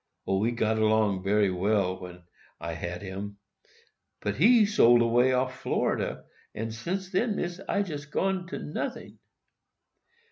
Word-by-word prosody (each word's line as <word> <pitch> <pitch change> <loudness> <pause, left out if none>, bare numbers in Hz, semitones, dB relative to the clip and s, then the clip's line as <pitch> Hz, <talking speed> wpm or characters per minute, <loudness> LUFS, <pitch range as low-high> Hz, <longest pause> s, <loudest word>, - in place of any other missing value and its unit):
O, 95 0 +1
we 110 +3 +2
got 110 -2 0
'long 110 -3 +2
bery 100 0 +2
well 95 0 0
when 90 -1 -10 0.4
I 85 +1 -4
had 85 +2 -5
him; 100 +1 -6 0.8
but 105 -1 -2
he 220 - +6
sold 120 - +5
way 120 +2 +3
off 130 0 0
Florida, - - -1 0.3
and, 110 +1 -4
sence 185 +10 -4
then, 210 +3 +1
Missis, 175 +1 -4
I 200 - +2
jest 145 -6 -7
gone 190 +2 -1
to - - -5
noting. 150 - -5
115 Hz, 145 wpm, -28 LUFS, -, 0.8 s, he